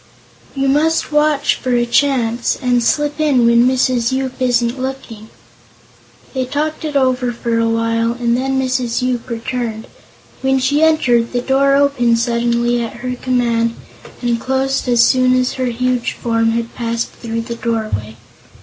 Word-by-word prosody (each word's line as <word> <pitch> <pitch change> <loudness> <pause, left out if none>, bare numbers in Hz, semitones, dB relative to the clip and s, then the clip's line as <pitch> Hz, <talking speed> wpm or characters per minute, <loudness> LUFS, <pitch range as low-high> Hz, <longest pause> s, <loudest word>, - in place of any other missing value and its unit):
You 275 0 0
must 310 +5 +1
watch 300 -1 +2
for 255 -2 0
a 240 0 +2
chance, 240 -2 +1
and 245 -2 +1
slip 295 +4 0
in 280 -6 +3
when 235 +1 +5
Mrs. 255 -2 +1
Yoop 260 -1 -2
isn't 245 0 +1
looking." 245 -5 -6 1.0
They 260 -1 -1
talked 300 +5 -3
it 305 -2 -4
over 255 -2 +1
for 230 -1 -2
a 230 0 +1
while 230 0 0
longer 240 +1 -4
and 235 0 +2
then 265 +1 -1
Mrs. 255 -2 -1
Yoop 250 -1 -2
returned. 230 -1 -4 0.6
When 265 0 +2
she 275 +3 +1
entered, 250 -8 +2
the 245 - 0
door 275 +2 +2
opened 275 -5 +2
suddenly, 235 0 0
at 230 - -6
her 250 0 -2
command, 235 -2 0 0.5
and 240 -1 0
closed 265 +1 -1
as 240 -1 +5
soon 255 +1 +3
as 255 0 0
her 260 -1 -2
huge 250 0 -1
form 230 -1 0
had 230 0 -3
passed 235 -1 -3
through 230 -1 -5
the 235 +1 -6
doorway. 215 - -3
245 Hz, 160 wpm, -17 LUFS, 235-265 Hz, 1.0 s, when